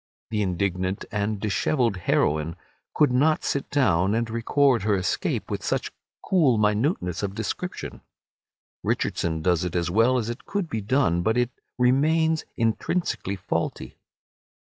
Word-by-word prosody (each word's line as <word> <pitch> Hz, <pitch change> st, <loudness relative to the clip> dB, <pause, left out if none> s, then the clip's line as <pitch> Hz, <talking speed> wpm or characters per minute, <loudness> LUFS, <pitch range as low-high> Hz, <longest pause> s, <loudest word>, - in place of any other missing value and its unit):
The 105 Hz, -1 st, 0 dB
indignant 95 Hz, 0 st, -1 dB
and 105 Hz, 0 st, -1 dB
dishevelled 110 Hz, +3 st, +1 dB
heroine 80 Hz, -2 st, +1 dB, 0.4 s
could 150 Hz, -4 st, +4 dB
not 150 Hz, +5 st, +2 dB
sit 140 Hz, -, -2 dB
down 95 Hz, -, +2 dB
and 115 Hz, 0 st, 0 dB
record 120 Hz, +2 st, +2 dB
her 105 Hz, 0 st, +2 dB
escape 95 Hz, -2 st, -1 dB
with -, -, -2 dB
such -, -, -1 dB, 0.3 s
cool 150 Hz, -, +3 dB
minuteness 105 Hz, -, +1 dB
of 100 Hz, -1 st, -3 dB
description. -, -, -5 dB, 0.8 s
Richardson 80 Hz, -1 st, -1 dB
does 90 Hz, -1 st, +2 dB
it 90 Hz, -1 st, -3 dB
as 85 Hz, 0 st, 0 dB
well 115 Hz, +6 st, +4 dB
as 115 Hz, -3 st, -1 dB
it 120 Hz, +1 st, -6 dB
could 200 Hz, -4 st, -2 dB
be 110 Hz, -7 st, -3 dB
done, 100 Hz, -6 st, +2 dB
but 110 Hz, +6 st, +1 dB
it 125 Hz, 0 st, +1 dB, 0.3 s
remains 155 Hz, +6 st, +2 dB
intrinsically 115 Hz, -, -1 dB
faulty. 85 Hz, -4 st, -3 dB
110 Hz, 140 wpm, -25 LUFS, 95-130 Hz, 0.8 s, could